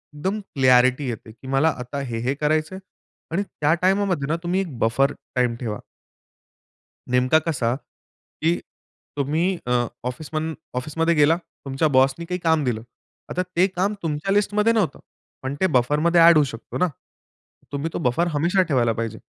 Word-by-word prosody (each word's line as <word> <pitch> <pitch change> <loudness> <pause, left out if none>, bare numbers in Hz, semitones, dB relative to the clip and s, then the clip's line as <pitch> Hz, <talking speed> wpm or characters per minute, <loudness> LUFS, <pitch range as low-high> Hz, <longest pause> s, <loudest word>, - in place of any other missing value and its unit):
एकदम 190 +8 -2 0.2
क्लॅरिटी 130 +1 +4
येते 115 -2 -6
की 125 +4 -14
मला 135 +4 +3
आता 125 +3 -5
हे, 120 -4 -4
हे 125 +4 0
करायचंय 155 +5 0 0.5
आणि 195 +4 0
त्या 150 -5 0
टाईमामध्ये 185 -6 +1
ना 160 - +1
तुम्ही 180 +2 0
एक 155 -10 -6
बफर 135 +6 +2 0.2
टाईम 125 -2 +1
ठेवा. 110 -4 -4 1.3
नेमका 130 +5 +4
कसा 125 -7 0
की 160 +3 -5 0.6
तुम्ही 150 +4 0 0.2
अ, - - -1 0.3
ऑफिस 125 +5 -5
म 160 +1 -1 0.2
ऑफिसमध्ये 165 +6 0
गेला 150 +3 +4 0.3
तुमच्या 135 +4 +1
बॉसनी 135 +5 +3
काही 180 +1 -3
काम 160 -2 +2
दिलं. 120 -4 -1 0.5
आता 180 - -1
ते 180 +2 +5
काम 190 +2 -1
तुमच्या 155 +4 -2
लिस्टमध्ये 210 +2 +2
नव्हतं. 205 -10 0 0.4
पण 135 +1 -3
ते 190 - +5
बफरमध्ये 150 +7 +3
एड 170 - +6
होऊ 150 - +6
शकतो 115 - -7
ना. 180 - +3 0.8
तुम्ही 145 +3 -2
तो - - -2
बफर 170 +8 +1
हमेशा 170 +6 +2
ठेवायला 120 -3 +3
पाहिजे. 115 0 -4
150 Hz, 160 wpm, -23 LUFS, 130-170 Hz, 1.3 s, एड